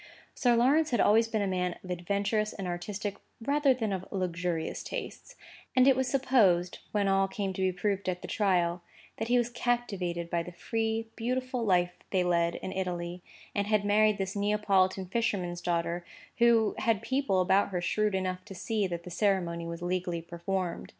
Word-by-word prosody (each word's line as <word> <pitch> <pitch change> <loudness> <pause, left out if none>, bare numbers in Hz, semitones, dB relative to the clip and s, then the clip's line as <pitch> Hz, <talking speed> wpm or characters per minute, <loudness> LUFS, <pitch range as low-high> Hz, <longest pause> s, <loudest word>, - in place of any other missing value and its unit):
Sir 245 -3 +3
Lawrence 285 +7 +4
had 240 - +1
always 225 +3 +5
been 220 -2 -1
a - - 0
man 180 -2 -1
of 185 - -7
adventurous 200 +4 -1
and 195 - -6
artistic, 200 +3 -4 0.2
rather 280 +4 +2
than 225 -5 0
of 190 0 -4
luxurious 175 -3 -2
tastes; - - -7 0.4
and 255 0 +6
it 270 - +6
was 260 0 0
supposed, 230 -10 +3
when 205 -2 +1
all 195 0 +3
came 195 0 -3
to 190 - -4
be 185 0 +2
proved 195 +1 -1
at 180 -1 -3
the - - -5
trial, 180 -4 +1 0.4
that 225 - -3
he 245 +1 +3
was 240 0 +1
captivated 200 -9 -1
by 170 0 0
the 180 - -7
free, 225 +4 -2
beautiful 255 +1 -2
life 180 -4 +2 0.2
they 185 -2 +2
lead 170 -1 +1
in 185 - -5
Italy, 180 -2 -3 0.3
and 200 0 0
had 210 -1 +2
married 210 0 +4
this 195 0 -3
Neapolitan 200 -2 +2
fisherman's 180 -4 -1
daughter, 170 0 -1 0.4
who 230 -2 +4
had 225 -4 +1
people 265 -8 +1
about 190 +2 +3
her 180 -2 -2
shrewd 210 +3 0
enough 185 -1 -2
to 195 - -9
see 205 +2 -1
that 170 -1 -5
the 180 - -9
ceremony 175 -3 0
was 170 +1 -6
legally 175 -1 -1
performed. 175 +1 -3
195 Hz, 185 wpm, -29 LUFS, 180-225 Hz, 0.4 s, and